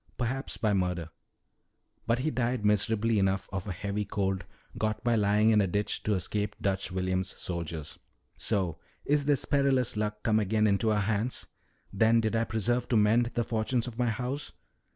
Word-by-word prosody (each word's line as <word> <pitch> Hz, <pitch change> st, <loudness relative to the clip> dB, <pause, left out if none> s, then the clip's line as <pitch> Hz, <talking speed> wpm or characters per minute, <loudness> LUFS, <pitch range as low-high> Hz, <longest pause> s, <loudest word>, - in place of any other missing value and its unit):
Perhaps 130 Hz, +2 st, -2 dB
by 110 Hz, -3 st, +1 dB
murder. 90 Hz, -4 st, -1 dB, 1.0 s
But 115 Hz, +1 st, +3 dB
he 150 Hz, +5 st, -1 dB
died 120 Hz, -2 st, -1 dB
miserably 105 Hz, +1 st, +2 dB
enough 95 Hz, 0 st, +1 dB
of 95 Hz, +1 st, -3 dB
a -, -, -2 dB
heavy 100 Hz, +3 st, -2 dB
cold 95 Hz, -1 st, -2 dB, 0.3 s
got 110 Hz, +1 st, -2 dB
by 120 Hz, -1 st, +2 dB
lying 105 Hz, +1 st, +3 dB
in 105 Hz, -1 st, +5 dB
a 100 Hz, -, +1 dB
ditch 105 Hz, +3 st, -1 dB
to 105 Hz, -, 0 dB
escape 105 Hz, +3 st, -2 dB
Dutch 95 Hz, -1 st, -1 dB
William's 95 Hz, 0 st, -2 dB
soldiers." 85 Hz, -3 st, -5 dB, 0.4 s
"'So 95 Hz, -7 st, -1 dB, 0.3 s
is 145 Hz, 0 st, +2 dB
this 145 Hz, -1 st, +2 dB
perilous 135 Hz, -5 st, +2 dB
Luck 105 Hz, 0 st, -2 dB
come 110 Hz, -1 st, +3 dB
again 105 Hz, +1 st, +1 dB
into 105 Hz, +2 st, +2 dB
our 105 Hz, -1 st, +2 dB
hands. 110 Hz, +4 st, -1 dB, 0.5 s
Then 110 Hz, +3 st, +4 dB
did 110 Hz, 0 st, 0 dB
I 115 Hz, 0 st, +2 dB
persevere 115 Hz, +3 st, 0 dB
to 120 Hz, -, +2 dB
mend 115 Hz, +3 st, +4 dB
the 120 Hz, -, +1 dB
fortunes 115 Hz, +2 st, 0 dB
of 120 Hz, -1 st, -8 dB
my 120 Hz, -1 st, +2 dB
house.' 125 Hz, +5 st, -3 dB
110 Hz, 175 wpm, -29 LUFS, 100-120 Hz, 1.0 s, in